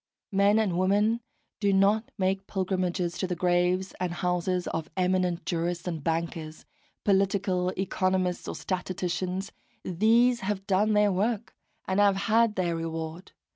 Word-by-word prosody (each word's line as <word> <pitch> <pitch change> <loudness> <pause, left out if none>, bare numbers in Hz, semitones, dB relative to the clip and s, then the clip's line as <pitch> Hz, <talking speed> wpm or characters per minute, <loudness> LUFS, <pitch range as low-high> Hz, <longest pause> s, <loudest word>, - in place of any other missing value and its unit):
Men 200 +2 +4
and 195 -6 +1
women 205 +5 +2 0.4
do 200 -2 +2
not 200 +3 +3
make 190 +1 0
pilgrimages 185 -2 -1
to 185 - 0
the 180 - -2
graves 180 +2 +1
and 180 -1 -1
houses 180 +1 -1
of 160 -1 -4
eminent 180 -1 +1
jurists 170 0 -2
and 165 -4 -4
bankers, 165 -1 -3 0.4
political 195 -2 +1
economists 185 -1 0
or - - -4
statisticians: 185 0 -3 0.3
these 230 +7 +3
have 195 -2 -3
done 205 +3 +2
their 210 -1 +4
work, 210 +4 -1 0.3
and 190 +1 +1
have 200 -1 +5
had 220 +2 +2
their 175 -2 0
reward. 165 +1 -5
185 Hz, 135 wpm, -27 LUFS, 175-200 Hz, 0.4 s, have